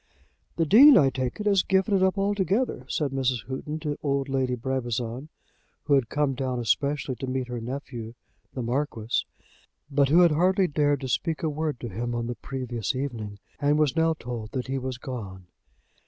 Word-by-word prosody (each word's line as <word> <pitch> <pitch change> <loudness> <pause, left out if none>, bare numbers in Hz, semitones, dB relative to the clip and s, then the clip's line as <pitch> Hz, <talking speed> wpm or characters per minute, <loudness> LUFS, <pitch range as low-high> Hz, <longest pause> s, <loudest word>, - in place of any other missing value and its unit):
"The 165 - +1
Dean, 260 - +9
I 135 -2 +5
take 130 +3 -3
it, 210 - -4
has 200 -2 +4
given 190 +2 +1
it 195 - +3
up 190 +1 +2
altogether," 200 - 0
said 145 -3 -1
Mrs. 130 -3 -1
Houghton 140 +3 -4
to 150 -2 -3
old 140 -1 -1
Lady 130 -2 0
Brabazon, 125 +1 -3 0.5
who 145 - +1
had 135 -5 +3
come 145 -2 +1
down 130 -1 -2
especially 140 +3 0
to 135 - -5
meet 130 -1 -2
her 120 -1 -4
nephew, 120 -2 -6 0.4
the 130 - -3
Marquis, 120 -2 -1 0.7
but 140 -1 +3
who 170 +5 +6
had 170 -2 +6
hardly 185 +5 +3
dared 145 -3 +1
to 130 - -4
speak 160 +6 -1
a 160 - +1
word 150 -3 -2
to 120 - -4
him 120 +3 -3
on 120 0 -2
the 120 - -3
previous 120 -2 -4
evening, 115 -7 -4 0.2
and 145 0 +2
was 150 -4 +2
now 165 0 +3
told 115 -5 -7
that 130 -2 -2
he 135 0 -2
was 130 -1 -4
gone. 100 -8 -7
135 Hz, 190 wpm, -26 LUFS, 125-155 Hz, 0.7 s, Dean